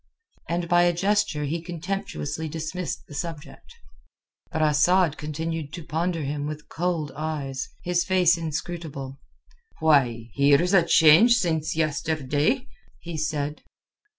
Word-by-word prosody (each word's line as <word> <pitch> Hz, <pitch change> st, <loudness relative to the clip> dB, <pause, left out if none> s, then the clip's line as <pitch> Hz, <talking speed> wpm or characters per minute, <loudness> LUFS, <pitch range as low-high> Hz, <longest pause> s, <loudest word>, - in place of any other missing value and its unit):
and 170 Hz, 0 st, -1 dB
by 175 Hz, +1 st, +4 dB
a 175 Hz, 0 st, +4 dB
gesture 185 Hz, -4 st, 0 dB
he 160 Hz, +4 st, -2 dB
contemptuously 165 Hz, -, -4 dB
dismissed 165 Hz, +3 st, -4 dB
the -, -, -13 dB
subject. 150 Hz, -1 st, -7 dB, 0.8 s
But 160 Hz, -, 0 dB
Asad 155 Hz, +2 st, +3 dB
continued 155 Hz, 0 st, -4 dB
to 170 Hz, -, -6 dB
ponder 165 Hz, +1 st, -2 dB
him 145 Hz, +1 st, -3 dB
with 150 Hz, 0 st, -7 dB
cold 165 Hz, -4 st, -2 dB
eyes, 145 Hz, -4 st, -4 dB
his 175 Hz, 0 st, +1 dB
face 180 Hz, -2 st, +4 dB
inscrutable. 155 Hz, -4 st, -5 dB, 0.6 s
"Why, 125 Hz, -8 st, +2 dB
here's 145 Hz, +6 st, +3 dB
a 185 Hz, -3 st, +6 dB
change 170 Hz, +9 st, +6 dB
since 160 Hz, -7 st, 0 dB
yesterday!" 155 Hz, -, 0 dB, 0.3 s
he 170 Hz, -1 st, -7 dB
said. 150 Hz, -1 st, -2 dB
160 Hz, 125 wpm, -25 LUFS, 150-175 Hz, 0.8 s, a